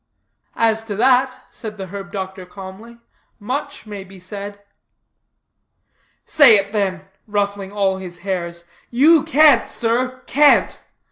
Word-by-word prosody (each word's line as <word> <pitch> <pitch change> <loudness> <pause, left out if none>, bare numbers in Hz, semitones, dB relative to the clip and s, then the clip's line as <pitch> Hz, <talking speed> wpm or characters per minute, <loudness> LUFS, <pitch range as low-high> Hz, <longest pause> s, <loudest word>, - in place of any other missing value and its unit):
"As 225 -1 +1
to 210 -2 -5
that," 255 +3 +2
said 215 -3 -8
the 190 - -6
herb 195 +1 -9
doctor 190 -1 -6
calmly, 195 +5 -11 0.4
"much 250 +6 -5
may 205 -2 -8
be 190 0 -15
said." 200 +2 -8 1.7
"Say 275 -7 +7
it, 200 0 0
then," 190 -3 -2 0.2
ruffling 200 -2 -2
all 195 -2 0
his 180 -2 -9
hairs. 170 -3 -4 0.3
"You 300 +6 +5
can't, 305 -1 +4
sir, 250 +2 -2
can't." 295 +1 +3
205 Hz, 125 wpm, -19 LUFS, 190-245 Hz, 1.7 s, Say